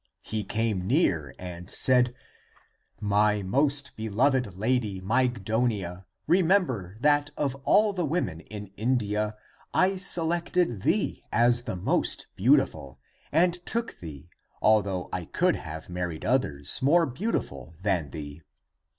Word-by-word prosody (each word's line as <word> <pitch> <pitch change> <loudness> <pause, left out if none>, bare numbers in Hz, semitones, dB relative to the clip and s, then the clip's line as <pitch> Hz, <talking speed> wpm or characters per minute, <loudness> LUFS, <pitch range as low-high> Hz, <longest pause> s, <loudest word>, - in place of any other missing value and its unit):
He 110 -1 -3
came 105 -2 -1
near 90 - +1
and 90 0 -8
said, 125 -1 +3 0.5
" - - -38
My 105 0 +2
most 140 +8 +2
beloved 110 0 0
lady 110 -3 0
Mygdonia, 110 -4 -1 0.2
remember 160 - +1
that 145 0 +3
of 140 -3 0
all 210 0 +4
the 180 -2 -2
women 145 - -2
in 105 +2 -9
In 125 +4 +1
dia 105 -1 -2 0.4
I 190 +1 +3
selected 170 - +1
thee - - 0
as 120 +2 +4
the 115 - -3
most 90 - 0
beautiful - - +1 0.3
and 175 +3 +2
took 235 +3 -3
thee, 80 -1 -10 0.3
although 100 -4 +2
I 90 -2 -3
could 180 - +1
have 80 -1 -8
married 90 -3 -4
others, 75 - +1
more 165 +6 +4
beautiful 120 - -4
than 90 -7 0
thee. 75 0 -8
110 Hz, 125 wpm, -27 LUFS, 90-145 Hz, 0.5 s, all